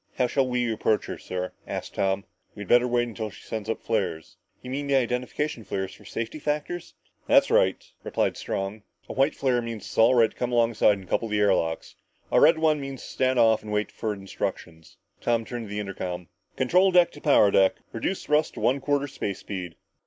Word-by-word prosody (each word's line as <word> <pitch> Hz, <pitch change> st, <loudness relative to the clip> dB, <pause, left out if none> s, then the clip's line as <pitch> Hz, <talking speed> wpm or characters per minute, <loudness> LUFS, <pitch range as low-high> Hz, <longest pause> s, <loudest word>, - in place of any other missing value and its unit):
"How 125 Hz, -, +2 dB
shall 130 Hz, +2 st, +1 dB
we 125 Hz, -2 st, 0 dB
approach 110 Hz, 0 st, +1 dB
her, -, -, -6 dB
sir?" 90 Hz, 0 st, -4 dB, 0.2 s
asked -, -, -5 dB
Tom. 95 Hz, 0 st, 0 dB, 0.3 s
"We'd 105 Hz, -2 st, -7 dB
better 120 Hz, +3 st, +5 dB
wait 120 Hz, 0 st, +1 dB
until 110 Hz, -2 st, -5 dB
she -, -, -14 dB
sends 110 Hz, -1 st, -5 dB
up 115 Hz, -, 0 dB
her -, -, -33 dB
flares." 95 Hz, -8 st, -2 dB, 0.3 s
"You 125 Hz, -, -7 dB
mean 140 Hz, +2 st, -3 dB
the 140 Hz, -, +2 dB
identification 125 Hz, +2 st, -1 dB
flares 95 Hz, -1 st, -4 dB
for -, -, -16 dB
safety 115 Hz, +6 st, -5 dB
factors?" 150 Hz, +4 st, -3 dB, 0.3 s
"That's -, -, +5 dB
right," -, -, +4 dB, 0.3 s
replied -, -, 0 dB
Strong. 100 Hz, +2 st, -4 dB, 0.3 s
"A -, -, -6 dB
white 135 Hz, +3 st, +2 dB
flare 125 Hz, -3 st, +1 dB
means 115 Hz, -2 st, -6 dB
it's -, -, -9 dB
all 115 Hz, +3 st, +6 dB
right 115 Hz, -2 st, +4 dB
to -, -, -23 dB
come 125 Hz, 0 st, -2 dB
alongside 115 Hz, -3 st, +3 dB
and 95 Hz, -1 st, -12 dB
couple 115 Hz, +4 st, -1 dB
air 105 Hz, -2 st, +3 dB
locks. 80 Hz, -2 st, -2 dB, 0.4 s
A -, -, +5 dB
red 160 Hz, -, +6 dB
one 155 Hz, -2 st, +2 dB
means 135 Hz, -1 st, -6 dB
to -, -, -9 dB
stand 130 Hz, 0 st, +1 dB
off 115 Hz, -2 st, +4 dB
and 105 Hz, -, -8 dB
wait 105 Hz, 0 st, -1 dB
for 110 Hz, -, -3 dB
instructions." 95 Hz, -4 st, -6 dB, 0.2 s
Strong 115 Hz, -1 st, 0 dB
turned 120 Hz, -2 st, -6 dB
to -, -, -12 dB
the 105 Hz, +1 st, -3 dB
intercom. 90 Hz, -3 st, -5 dB, 0.3 s
"Control 180 Hz, +9 st, +4 dB
deck 180 Hz, -2 st, +5 dB
to -, -, -13 dB
power 120 Hz, -9 st, +5 dB
deck. 95 Hz, -1 st, +4 dB, 0.2 s
Reduce 180 Hz, +12 st, -2 dB
thrust 150 Hz, +1 st, +1 dB
to -, -, -6 dB
one 135 Hz, +2 st, +1 dB
quarter 145 Hz, 0 st, +1 dB
space 105 Hz, -8 st, -4 dB
speed!" 90 Hz, -5 st, -6 dB
115 Hz, 210 wpm, -26 LUFS, 100-135 Hz, 0.4 s, all